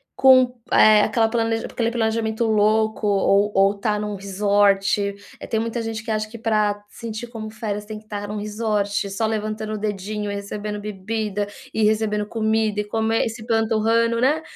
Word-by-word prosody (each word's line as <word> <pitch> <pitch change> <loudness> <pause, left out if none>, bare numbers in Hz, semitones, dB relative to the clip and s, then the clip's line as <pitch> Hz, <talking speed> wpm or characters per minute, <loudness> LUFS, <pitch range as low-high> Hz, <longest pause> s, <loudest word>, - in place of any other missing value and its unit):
com, 255 -2 +5
eh, 215 -1 +7
aquele 225 +1 +2
planeja 225 -1 -1
aquele 230 -1 -1
planejamento 225 -1 0
louco 220 0 +2
ou 200 0 +3
ou 195 +1 +4
estar 210 +1 -1
num 210 0 -3
resort 200 0 +2 0.3
eh, - - -8
tem 220 - 0
muita 230 +1 -2
gente 225 0 -4
que 225 - -9
acha 215 0 -1
que 230 - -9
para 210 -2 +1
sentir 230 +1 -7
como 225 -2 -7
férias, 215 -2 -4
tem 215 0 -7
que 215 - -22
estar 205 -1 -6
em - - -4
um - - -4
resort 210 -1 -1
só 195 +3 -1
levantando 215 0 -3
o - - -2
dedinho, 210 0 -3
recebendo 205 +1 -5
bebida, 210 0 -3 0.3
e 220 - +1
recebendo 210 -1 +1
comida 220 -1 0
e - - +1
comer 225 +1 0
e - - -1
se 225 +1 -9
empanturrando, 225 0 +1
né. 295 +5 +2
215 Hz, 180 wpm, -22 LUFS, 205-225 Hz, 0.3 s, eh